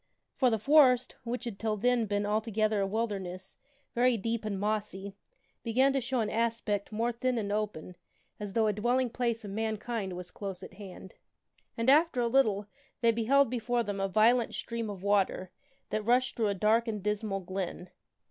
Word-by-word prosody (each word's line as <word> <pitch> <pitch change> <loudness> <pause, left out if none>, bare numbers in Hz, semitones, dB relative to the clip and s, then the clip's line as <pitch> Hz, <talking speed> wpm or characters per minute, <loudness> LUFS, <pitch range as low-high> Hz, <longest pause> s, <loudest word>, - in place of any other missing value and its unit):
For 255 - +3
the 225 - +1
forest, 255 0 +5
which 245 +1 -4
had 235 -5 -6
till 215 -1 -1
then 240 +1 +2
been 205 0 0
altogether 215 0 0
a 195 - +1
wilderness, 195 -3 -4 0.3
very 245 0 +3
deep 225 +1 -2
and 200 -3 -2
mossy, 205 -1 -2 0.5
began 260 +4 +2
to 270 - +1
show 250 0 -1
an 215 - -1
aspect 225 -3 -1
more 230 +3 0
thin 250 +1 -1
and 205 -3 -2
open, 205 -5 -3 0.4
as 205 -2 -6
though 225 0 +2
a 210 - +2
dwelling 240 +4 +1
place 235 -2 -1
of 200 - -6
mankind 220 -1 -3
was 180 0 -8
close 195 -3 -6
at - - -10
hand. 190 -1 -11 0.6
And, 230 +1 -1
after 300 0 +5
a 240 - +2
little, 220 -5 +2 0.4
they 230 -1 +5
beheld 235 +3 +3
before 240 0 0
them 205 -2 -4
a 195 - +1
violent 225 +4 +3
stream 230 -2 -4
of 195 -2 -7
water, 195 -2 +1 0.4
that 215 - 0
rushed 250 +3 +2
through 225 -2 +1
a 200 - 0
dark 220 +4 +2
and 210 -3 -3
dismal 210 -1 -1
glen. 185 0 -5
220 Hz, 185 wpm, -30 LUFS, 200-235 Hz, 0.6 s, forest